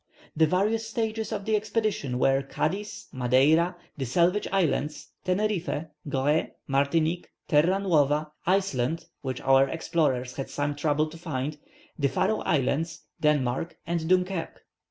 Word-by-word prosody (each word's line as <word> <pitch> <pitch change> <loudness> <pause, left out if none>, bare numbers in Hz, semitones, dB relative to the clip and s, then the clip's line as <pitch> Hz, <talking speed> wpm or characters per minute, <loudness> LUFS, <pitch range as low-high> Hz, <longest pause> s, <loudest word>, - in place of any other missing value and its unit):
The 160 0 +4
various 215 +6 +1
stages 220 -1 -2
of 200 -2 -3
the 220 - +2
expedition 210 - -1
were 135 +1 +3
Cadiz, 195 +10 -3
Madeira, 135 +8 +3 0.2
the 135 - -2
Salvage 175 - +2
Islands, 155 -5 0
Teneriffe, 185 -5 -1 0.2
Goree, 140 +3 +1 0.2
Martinique, 155 +5 +1 0.2
Terra 165 +6 +4
Nuova, 155 -5 +2 0.2
Iceland 165 -6 +1 0.2
which 130 -2 -4
our 135 0 +4
explorers 135 -6 0
had 135 - -4
some 145 0 -2
trouble 150 +1 +1
to 165 +1 -11
find 150 -2 -3 0.4
the 140 -1 +2
Faroe 190 +9 +1
Islands, 155 +3 0 0.2
Denmark 150 0 +1
and 170 -1 -2
Dunkerque. 185 -1 0
160 Hz, 130 wpm, -27 LUFS, 140-185 Hz, 0.4 s, The